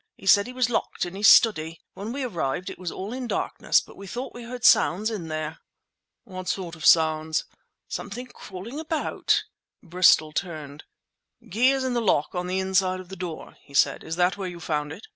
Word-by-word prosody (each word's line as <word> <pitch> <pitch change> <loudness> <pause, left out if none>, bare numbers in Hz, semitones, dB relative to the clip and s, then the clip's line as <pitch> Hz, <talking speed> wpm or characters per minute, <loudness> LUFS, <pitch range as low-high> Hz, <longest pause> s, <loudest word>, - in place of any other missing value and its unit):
He - - -14
said 200 +2 +5
he 250 - -8
was 250 -2 +1
locked - - -1
in 175 - -7
his 205 +3 +3
study. 165 -8 +5
When 205 +3 -6
we 275 +2 -3
arrived 175 - -2
it - - -11
was 180 -2 -4
all 200 +5 -6
in 255 -1 -4
darkness—but - - 0
we 200 - -10
thought 245 +7 -5
we 240 - -9
heard 240 +1 -6
sounds 210 +6 +4
in 180 -7 -5
here." 155 0 -4 0.6
"What 185 -2 -8
sort 175 -3 -3
of 160 - -11
sounds?" 160 -1 +3 0.4
"Something 225 +5 -6
crawling 230 +3 -9
about!" 320 0 0 0.4
Bristol 175 -3 +4
turned. 155 -4 -5 0.7
"Key 240 +7 +4
is 270 -1 +1
in 260 -1 -1
the 240 - +1
lock 180 -9 +1
on 180 -1 -3
the 185 +1 -1
inside 190 -1 +1
of 185 -1 -11
the 190 - -7
door," 175 -3 -7
he 140 - -15
said. - - +3
"Is 160 - -4
that 180 +2 +2
where 190 -2 -4
you 175 -1 -9
found 150 -3 -2
it?" 180 +8 -9
185 Hz, 200 wpm, -25 LUFS, 165-225 Hz, 0.7 s, said